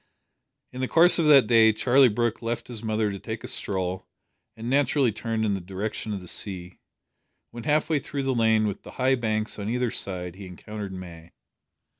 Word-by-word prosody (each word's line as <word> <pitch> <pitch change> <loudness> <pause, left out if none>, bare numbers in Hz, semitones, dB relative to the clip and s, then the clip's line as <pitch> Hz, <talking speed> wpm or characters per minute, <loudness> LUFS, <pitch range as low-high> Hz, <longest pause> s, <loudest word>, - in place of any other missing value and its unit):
In 130 - -6
the 130 - 0
course 170 +4 +5
of 160 - +2
that 140 -5 +7
day 115 -1 +5
Charlie 130 +4 +4
Brooke 120 +1 -1
left 115 +1 -4
his 115 -3 -5
mother 110 -2 -1
to 100 - -6
take 110 +1 -6
a - - -6
stroll, 95 -1 -2 0.5
and 115 +1 -6
naturally 135 -1 +2
turned 110 +1 -2
in 105 - +1
the 95 - -3
direction 100 +4 -5
of 100 -2 -4
the 90 - -11
sea. 90 -1 -2 0.7
When 120 -1 -9
half 150 0 +2
way 155 -2 +1
through 140 +1 -5
the 135 0 0
lane 110 -2 +3
with 100 -2 -3
the - - -12
high 130 +1 +2
banks 110 -4 -1
on 100 +1 -4
either 125 0 0
side 90 -2 -4
he 100 -1 -9
encountered 100 +3 -8
May. 85 -3 -10
110 Hz, 200 wpm, -25 LUFS, 100-125 Hz, 0.7 s, that